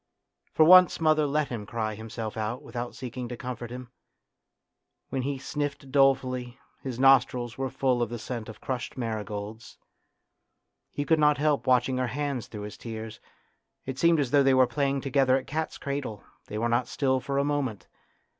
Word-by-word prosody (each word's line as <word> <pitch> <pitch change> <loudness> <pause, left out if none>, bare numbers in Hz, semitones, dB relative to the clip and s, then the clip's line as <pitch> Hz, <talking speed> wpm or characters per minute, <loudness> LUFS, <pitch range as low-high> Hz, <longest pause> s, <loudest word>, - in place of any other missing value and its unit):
For 155 - +4
once 185 +2 +7
mother 155 -2 +3
let 150 +1 0
him 110 -4 -5
cry 110 -1 -2
himself 110 0 -6
out 110 +3 -3
without 120 0 -6
seeking 125 -1 -6
to 120 - -6
comfort 120 -1 -6
him; 125 0 -8 1.2
when 135 - -2
he 140 +2 -2
sniffed 140 -1 -4
dolefully, 130 -2 +2 0.2
his 130 -3 -5
nostrils 125 -3 +4
were 135 0 -2
full 130 -2 0
of 120 - 0
the 120 - -4
scent 115 0 -6
of 110 - -10
crushed 130 0 -4
marigolds. 110 -1 -5 1.1
He 145 - -3
could 160 0 +3
not 150 -1 +4
help 150 -1 +1
watching 130 0 +3
her 130 - 0
hands 140 -1 -3
through 105 - -8
his 105 - -8
tears; 110 -1 -7 0.7
it 130 0 -5
seemed 170 -1 +4
as 135 -4 0
though 145 -1 +5
they 135 -1 +4
were 130 0 +6
playing 135 +2 -1
together 135 -1 +3
at 130 - -5
cat's 160 +2 -3
cradle; 140 -8 -4 0.2
they 105 - -5
were 115 +2 0
not 120 +1 +1
still 130 -2 +1
for 140 +1 -3
a 140 - +3
moment. 135 -10 -2
130 Hz, 180 wpm, -27 LUFS, 120-140 Hz, 1.2 s, once